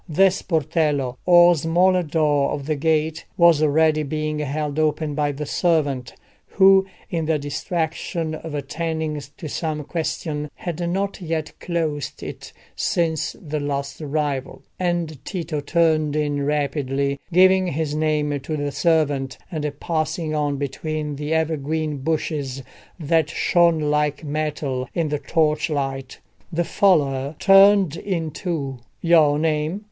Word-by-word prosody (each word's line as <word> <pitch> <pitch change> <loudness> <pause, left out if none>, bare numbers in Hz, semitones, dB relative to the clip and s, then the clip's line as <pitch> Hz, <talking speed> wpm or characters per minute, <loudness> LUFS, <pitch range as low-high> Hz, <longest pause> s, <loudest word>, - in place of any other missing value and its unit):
The 190 +5 +5
sportello, 150 -7 0
or 175 0 +7
smaller 175 +4 +3
door 150 -3 +1
of 140 -2 -4
the 155 +1 0
gate, 160 +1 0
was 170 -3 +5
already 155 +1 +3
being 155 +1 -2
held 150 +1 -2
open 155 0 0
by 145 0 0
the 145 +1 -5
servant, 145 -6 0 0.3
who, 195 0 +5 0.2
in 165 -2 -1
the 160 -1 +2
distraction 160 +2 -3
of 155 -1 -6
attending 155 +1 -3 0.2
to 160 - -6
some 155 0 -3
question, 150 -1 -3
had 175 0 -4
not 195 +2 -2
yet 160 -2 -3
closed 160 -5 -3
it - - -8 0.2
since 165 -2 0
the 155 -3 -4
last 140 0 -3
arrival, 145 -3 -3 0.2
and 175 -5 -2
Tito 165 -5 -3
turned 155 0 +1
in 145 -2 0
rapidly, 140 -1 -1
giving 185 +1 +5
his 155 -2 -2
name 150 -2 0
to 155 +3 -4
the 145 0 -2
servant, 140 -3 +1
and 150 -3 -2
passing 160 -1 -2
on 145 -2 0
between 150 +2 -3
the 150 +1 -4
evergreen 155 -1 -1
bushes 140 -2 -2 0.4
that 160 0 +1
shone 170 0 +3
like 150 0 0
metal 145 -4 -3
in 165 -3 0
the 150 0 -1
torchlight. 145 -3 -1 0.3
The 170 +1 0
follower 145 -8 +2
turned 195 -4 +6
in 170 -5 -3
too. 145 -6 -4 0.2
"Your 160 -4 +5
name?" 155 +3 0
155 Hz, 130 wpm, -22 LUFS, 145-165 Hz, 0.4 s, or